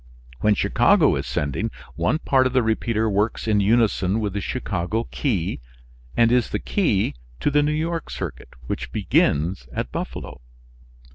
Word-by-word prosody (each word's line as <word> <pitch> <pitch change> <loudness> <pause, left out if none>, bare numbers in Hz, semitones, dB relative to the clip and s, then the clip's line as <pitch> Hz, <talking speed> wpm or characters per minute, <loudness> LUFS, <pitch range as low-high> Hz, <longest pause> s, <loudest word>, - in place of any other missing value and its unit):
When 105 -1 +3
Chicago - - +4
is - - -3
sending, 75 - -1 0.2
one 85 - +1
part 130 -4 +3
of 125 - -5
the 130 -2 +3
repeater 110 0 0
works 105 +2 0
in 105 -2 +3
unison 105 -2 +2
with 105 -3 -2
the 100 - -2
Chicago 100 +7 -2
key 95 - -1 0.6
and 115 0 +5
is 125 -2 +3
the - - -1
key 105 - 0 0.3
to 145 - +1
the 145 +1 +4
New 150 +1 +1
York 165 +2 -2
circuit, - - -6 0.2
which 60 - -4
begins 80 +7 +1
at - - -4
Buffalo. - - -6
110 Hz, 155 wpm, -23 LUFS, 100-125 Hz, 0.6 s, and